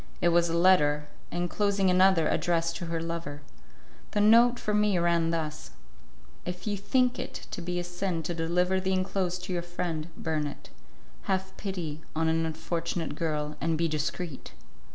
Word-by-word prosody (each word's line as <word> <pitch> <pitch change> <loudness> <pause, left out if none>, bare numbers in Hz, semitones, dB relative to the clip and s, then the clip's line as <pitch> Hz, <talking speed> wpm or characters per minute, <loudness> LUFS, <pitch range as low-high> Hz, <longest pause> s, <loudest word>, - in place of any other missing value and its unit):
It 175 - +3
was 170 0 +3
a 165 - 0
letter, 150 -5 +4 0.2
enclosing 195 +2 +1
another 185 -3 +5
addressed 165 0 +1
to 175 - -5
her 165 0 -2
lover. 165 -3 -5 0.7
The 210 - +1
note 235 +4 +6
for 210 - -2
me 210 -2 +3
ran 170 -1 +2
thus: 160 -2 -3 0.7
"If 180 0 -5
you 210 -1 0
think 250 +5 +1
it - - -6
to - - -4
be 175 +1 -3
a 175 - -1
sin 175 -1 -2
to 175 - -2
deliver 180 +3 +1
the 190 0 0
enclosed 185 -1 -1
to 185 0 -3
your 175 - 0
friend, 175 -2 -3
burn 155 -2 -1
it. 145 - -10 0.5
Have 190 0 -1
pity 170 -6 -4
on 160 +1 +1
an 165 0 +1
unfortunate 165 +1 -3
girl, 150 -2 -2
and 165 -1 +1
be 165 +1 +2
discreet." 155 - -4
175 Hz, 170 wpm, -28 LUFS, 165-185 Hz, 0.7 s, note